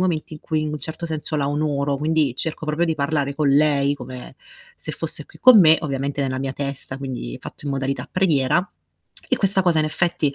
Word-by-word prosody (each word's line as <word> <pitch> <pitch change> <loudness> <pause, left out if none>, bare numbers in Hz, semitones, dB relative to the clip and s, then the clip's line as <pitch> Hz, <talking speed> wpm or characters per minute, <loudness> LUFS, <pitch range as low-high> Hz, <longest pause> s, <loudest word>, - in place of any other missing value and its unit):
momenti 165 -4 -1
in 150 - -11
cui 155 -1 -1
in 155 - -2
un 150 - -4
certo 165 +1 -5
senso 155 -1 -3
la 140 -1 0
onoro, 145 -1 0
quindi 150 -4 +1
cerco 155 +2 -3
proprio 155 +3 +1
di 160 - 0
parlare 140 -1 0
con 150 -2 +1
lei 145 0 +3
come 125 -2 -9 0.4
se - - -6
fosse - - -1
qui - - -17
con 255 -5 +9
me, 160 -2 +7
ovviamente 140 0 -2
nella 130 -1 -2
mia 135 -1 -2
testa, 140 -1 -4
quindi 125 - -5
fatto - - -10
in 140 - -1
modalità 135 0 -3
preghiera. 170 -1 +2 0.6
E - - +2
questa 195 -1 +2
cosa 170 -3 +3
in 155 - +2
effetti, 160 -3 0
150 Hz, 210 wpm, -22 LUFS, 140-160 Hz, 0.6 s, con